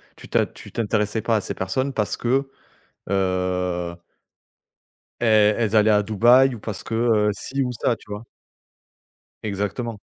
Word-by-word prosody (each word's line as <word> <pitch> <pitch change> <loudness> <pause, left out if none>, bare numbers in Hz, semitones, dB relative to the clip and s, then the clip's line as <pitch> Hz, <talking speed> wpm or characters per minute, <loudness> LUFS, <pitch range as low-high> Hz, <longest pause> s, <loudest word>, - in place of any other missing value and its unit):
Tu - - -14
t'es - - +1
tu - - -12
t'intéressais 110 -1 -1
pas 115 - +1
à 105 - -1
ces - - -5
personnes 130 +9 -2
parce 105 -4 -1
que, 135 +3 0 0.6
heu 90 -2 -1 1.2
elles, 105 -2 +4
elles 110 -2 +1
allaient 110 0 +5
à 105 -1 +4
Dubaï 120 +5 +5
ou - - -10
parce 105 -1 -6
que, 115 - -6
heu, 110 -2 +3
ci 135 +7 -3
ou 125 - -2
ça, 120 0 0
tu 105 - -20
vois? 105 +2 -5 1.2
Exactement. 105 +2 -3
110 Hz, 155 wpm, -23 LUFS, 100-120 Hz, 1.2 s, allaient